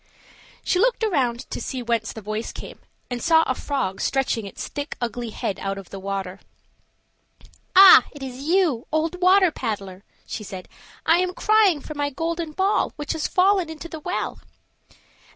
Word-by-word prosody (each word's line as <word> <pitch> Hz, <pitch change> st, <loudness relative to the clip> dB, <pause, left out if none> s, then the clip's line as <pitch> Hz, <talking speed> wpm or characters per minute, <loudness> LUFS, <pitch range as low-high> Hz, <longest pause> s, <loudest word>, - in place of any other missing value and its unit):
She 360 Hz, -, +1 dB
looked 480 Hz, +2 st, +2 dB
around 265 Hz, -, 0 dB
to -, -, -4 dB
see 255 Hz, -2 st, -4 dB
whence 230 Hz, -1 st, -1 dB
the 220 Hz, -, -9 dB
voice 215 Hz, +2 st, -4 dB
came, -, -, -10 dB, 0.3 s
and 245 Hz, -1 st, -3 dB
saw 325 Hz, -1 st, +5 dB
a 260 Hz, -, 0 dB
frog 255 Hz, -8 st, -3 dB
stretching 265 Hz, -5 st, 0 dB
his -, -, -7 dB
thick 290 Hz, 0 st, -6 dB
ugly 240 Hz, 0 st, -3 dB
head 200 Hz, -2 st, -4 dB
out 195 Hz, 0 st, -3 dB
of 195 Hz, -2 st, -10 dB
the 195 Hz, -, -7 dB
water. 195 Hz, -1 st, -4 dB, 1.4 s
"Ah! 375 Hz, -9 st, +10 dB
it 290 Hz, -2 st, -10 dB
is 255 Hz, -2 st, -6 dB
you, 320 Hz, -6 st, +1 dB
old 325 Hz, +4 st, -1 dB
water 370 Hz, 0 st, +5 dB
paddler!" 200 Hz, -7 st, -5 dB, 0.2 s
said 190 Hz, -4 st, -7 dB
she. -, -, -24 dB, 0.3 s
"I 330 Hz, -, +5 dB
am 365 Hz, 0 st, -1 dB
crying 420 Hz, -8 st, +3 dB
for 305 Hz, -, -8 dB
my 290 Hz, -1 st, -1 dB
golden 330 Hz, +2 st, -3 dB
ball, 385 Hz, +5 st, +1 dB
which 295 Hz, -1 st, -3 dB
has 320 Hz, -2 st, -2 dB
fallen 375 Hz, -2 st, +2 dB
into 320 Hz, +1 st, -8 dB
the 320 Hz, -1 st, -8 dB
well." 355 Hz, +4 st, -3 dB
285 Hz, 170 wpm, -23 LUFS, 225-345 Hz, 1.4 s, Ah